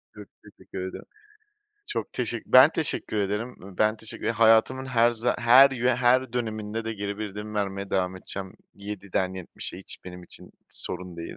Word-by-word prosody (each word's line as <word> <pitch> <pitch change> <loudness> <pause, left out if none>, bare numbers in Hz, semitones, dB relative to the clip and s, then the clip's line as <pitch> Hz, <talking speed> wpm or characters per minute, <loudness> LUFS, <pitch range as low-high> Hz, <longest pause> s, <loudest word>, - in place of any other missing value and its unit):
Çok - - -11 0.2
teşekkür 95 - -9
ederim. - - -10 0.8
Çok - - -4
teşek - - -3
ben - - +8
teşekkür - - -1
ederim. 105 +5 -2
Iıı, 95 -1 -12
ben 110 +1 +3
teşekkür 110 +1 -5
hayatımın 115 +3 +4
her 120 -2 +4
za 120 +2 0
her 125 +3 +7
yö 125 -1 0
her 130 0 +3
döneminde 110 -2 -3
de 115 - -2
geri 100 0 -4
bildirim 105 0 -6
vermeye 100 -1 -2
devam 95 -1 0
edeceğim 95 0 -6 0.2
yediden 100 -2 -3
yetmişe 90 0 -7
hiç 95 - -8
benim 90 0 -9
için 90 - -10 0.2
sorun 90 -1 -6
değil. 85 - -7
105 Hz, 165 wpm, -26 LUFS, 95-115 Hz, 0.8 s, ben